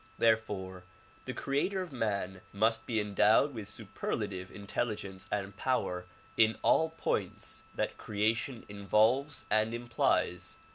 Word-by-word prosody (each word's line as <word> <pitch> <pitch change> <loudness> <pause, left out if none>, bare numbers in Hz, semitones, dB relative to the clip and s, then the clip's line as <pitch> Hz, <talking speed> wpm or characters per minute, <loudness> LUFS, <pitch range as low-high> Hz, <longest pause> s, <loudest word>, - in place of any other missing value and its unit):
Therefore 105 -5 +1 0.4
the - - -3
creator 145 +8 0
of 180 -3 -4
man 100 -6 -2
must 110 +2 +1
be 115 -3 +1
endowed 105 +6 +4
with 110 -4 -6
superlative 95 -1 -4
intelligence 100 -2 -3
and 100 -1 -2
power 90 -6 -1 0.3
in 110 0 +5
all 160 - +4
points - - -2
that - - -2
creation 110 +4 0
in 100 0 -9
volves 130 +5 +3
and 110 +2 +3
implies. 110 -6 0
110 Hz, 125 wpm, -32 LUFS, 100-120 Hz, 0.4 s, in